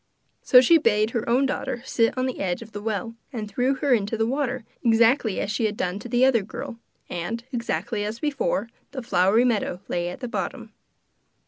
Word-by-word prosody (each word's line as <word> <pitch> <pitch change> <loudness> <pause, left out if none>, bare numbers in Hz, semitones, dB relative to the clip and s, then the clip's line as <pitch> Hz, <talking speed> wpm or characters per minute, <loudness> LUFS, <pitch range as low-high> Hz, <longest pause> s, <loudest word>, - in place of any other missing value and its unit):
So 250 - +7
she 330 +6 +6
bade 215 -4 +2
her 230 -1 -2
own 255 +4 +3
daughter 245 -2 -3
sit 230 -1 +1
on 255 - +1
the 255 - -3
edge 185 +3 -2
of 225 - -15
the 205 -1 -6
well, 225 +2 -3 0.2
and 220 -4 -4
threw 250 +6 0
her 270 0 +1
into 220 -1 0
the 225 - +1
water, 255 -1 -1 0.2
exactly 230 -1 +3
as 200 - -2
she 220 +1 0
had 210 -1 -1
done 180 +2 -2
to 245 - -9
the 245 +2 +4
other 250 -4 +4
girl; 215 +3 -7 0.3
and, 175 +7 -4
exactly 235 -2 -2
as 210 +2 -3
before, 270 -6 -1 0.3
the 260 -3 -5
flowery 220 +1 +3
meadow 215 -7 0
lay 175 0 -1
at 180 - -8
the 250 - -4
bottom. - - -5
230 Hz, 205 wpm, -24 LUFS, 210-250 Hz, 0.3 s, So